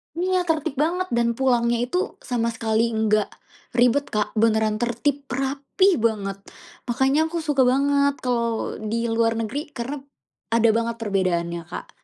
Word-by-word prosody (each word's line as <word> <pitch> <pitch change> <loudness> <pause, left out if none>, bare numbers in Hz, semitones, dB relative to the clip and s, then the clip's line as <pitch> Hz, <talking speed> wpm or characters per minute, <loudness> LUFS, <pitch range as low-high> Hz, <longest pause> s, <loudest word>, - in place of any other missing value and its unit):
Iya, 365 +1 0
tertib 315 -3 -1
banget 355 +5 0
dan 235 0 +1
pulangnya 240 -2 +2
itu 255 +9 -1 0.3
sama 235 -2 +1
sekali 225 0 +1
nggak, 215 -1 +2 0.5
ribet, 250 +4 +4
Kak, 210 -1 0
beneran 220 -1 +2
tertib, 250 +5 -1
rapih 275 +9 +1
banget. 200 -3 -2 0.5
Makanya 265 +4 +2
aku 335 0 -3
suka 295 -4 +2
banget 280 +2 +3
kalau 235 -2 -1
di 230 +1 -1
luar 225 0 +2
negeri 230 +5 -2
karena, 260 +4 -4 0.6
ada 230 0 +4
banget 230 0 -1
perbedaannya, 175 -5 -1
Kak. - - -10
235 Hz, 140 wpm, -23 LUFS, 225-280 Hz, 0.6 s, ribet